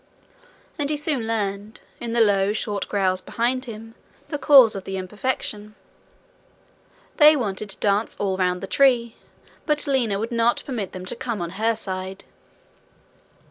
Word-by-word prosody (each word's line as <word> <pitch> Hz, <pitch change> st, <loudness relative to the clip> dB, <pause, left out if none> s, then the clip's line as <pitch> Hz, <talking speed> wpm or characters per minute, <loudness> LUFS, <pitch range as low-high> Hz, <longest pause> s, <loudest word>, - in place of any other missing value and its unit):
And 285 Hz, -1 st, -1 dB
he 300 Hz, -, 0 dB
soon 290 Hz, -6 st, -2 dB
learned, 210 Hz, -1 st, -3 dB, 0.2 s
in 235 Hz, -1 st, -5 dB
the 235 Hz, -, +3 dB
low 200 Hz, -2 st, +3 dB
short 205 Hz, -2 st, -3 dB
growls 185 Hz, -2 st, +1 dB
behind 255 Hz, +5 st, -1 dB
him, 225 Hz, -1 st, -9 dB, 0.4 s
the 290 Hz, -, -3 dB
cause 265 Hz, -8 st, +7 dB
of 195 Hz, -, -6 dB
the 195 Hz, 0 st, -4 dB
imperfection: 210 Hz, +1 st, -4 dB, 1.4 s
they 305 Hz, -1 st, +8 dB
wanted 210 Hz, -5 st, -3 dB
to -, -, -4 dB
dance 205 Hz, +2 st, 0 dB
all 195 Hz, -2 st, -1 dB
round 180 Hz, -1 st, 0 dB
the -, -, -4 dB
tree, 240 Hz, -1 st, +2 dB, 0.5 s
but 300 Hz, -1 st, +2 dB
Lina 250 Hz, -8 st, +1 dB
would 225 Hz, +4 st, -4 dB
not 235 Hz, 0 st, +1 dB
permit 225 Hz, -9 st, -4 dB
them 185 Hz, 0 st, -8 dB
to -, -, -1 dB
come 235 Hz, -3 st, -4 dB
on 170 Hz, -1 st, -4 dB
her 220 Hz, +4 st, 0 dB
side. 190 Hz, -2 st, -6 dB
215 Hz, 155 wpm, -23 LUFS, 195-245 Hz, 1.4 s, they